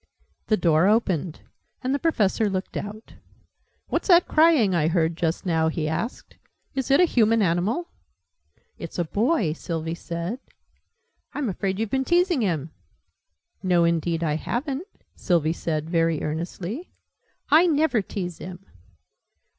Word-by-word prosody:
The 215 - +3
door 165 0 +3
opened, 185 -7 0 0.4
and 260 +1 0
the 285 - 0
Professor 220 - +1
looked 190 -1 -4
out. 210 +2 -6 0.8
"What's - - -1
that 350 -2 +6
crying 310 - +4
I 155 -3 +2
heard 165 -1 +1
just 165 +1 -2
now?" 160 -3 +2
he 160 -1 -2
asked. 160 +10 -4 0.4
"Is 265 -1 -3
it 275 - +5
a - - +7
human 225 -7 +3
animal?" 195 - 0 0.9
"It's - - -7
a 175 - +1
boy," 210 - +1
Sylvie 165 0 -4
said. 170 +7 -5 1.0
"I'm 280 -6 -1
afraid 190 0 -2
you've 220 -1 -2
been 265 0 +1
teasing 345 -1 +2
him?" 165 -7 -1 0.9
"No, 180 -2 +3
indeed 170 0 0
I 150 -2 0
haven't!" 275 - -3 0.3
Sylvie 165 -3 +1
said, 155 -2 -3
very 165 -2 +1
earnestly. 175 - -4 0.6
"I 325 +4 +7
never 305 -7 +2
tease 180 -3 -5
him!" 180 +2 -9
190 Hz, 140 wpm, -24 LUFS, 165-255 Hz, 1.0 s, a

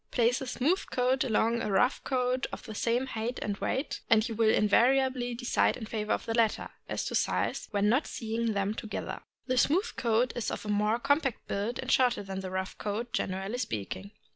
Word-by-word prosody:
Place 245 +2 +2
a 265 - -4
smooth 300 +9 +1
coat 255 +1 +2
alongside 230 0 +1
of - - -2
a - - -2
rough 250 +7 +2
coat 255 0 0
of - - -7
the 220 -3 -7
same 235 +4 +1
height 240 -1 -3
and 205 - -2
weight, 265 +7 -2
and 225 0 +5
you 230 - -4
will 220 0 +3
invariably 245 +3 +3
decide 245 +1 +1
in 225 - -6
favor 215 -1 -3
of - - 0
the 225 - -2
latter, 225 -2 +1 0.2
as - - -2
to - - -3
size, - - 0
when 205 -1 +1
not 255 +8 +2
seeing 225 0 -2
them 200 +1 0
together. 220 -1 -5 0.2
The 255 -1 +1
smooth 370 - +2
coat 235 +1 +2
is 240 - -2
of - - -5
a - - -4
more 210 +2 +2
compact 275 0 0
build 210 +5 -2
and - - -3
shorter 245 -5 +3
than 195 -1 -5
the 190 -1 -5
rough 190 0 -3
coat, 220 +3 -3
generally 195 +1 -2
speaking. 100 - -4
230 Hz, 210 wpm, -30 LUFS, 210-250 Hz, 0.2 s, and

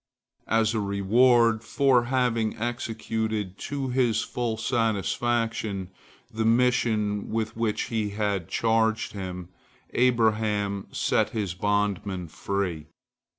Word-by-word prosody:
As 110 0 +2
a 110 - 0
reward 110 +3 +3
for 130 -2 +3
having 120 -3 0
executed 110 -4 -3
to 140 -2 -3
his 120 -3 +2
full 120 -2 -2
satisfaction 110 -3 -1 0.4
the 110 0 -1
mission 115 -3 +2
with 110 0 -2
which 115 -2 0
he 110 -2 0
had 100 -4 -1
charged 110 -1 +1
him, 90 -3 -6 0.4
Abraham 110 -5 +1
set - - +1
his 100 -5 -1
bondman 100 -2 -1
free. 85 -2 -3
110 Hz, 105 wpm, -26 LUFS, 100-115 Hz, 0.4 s, reward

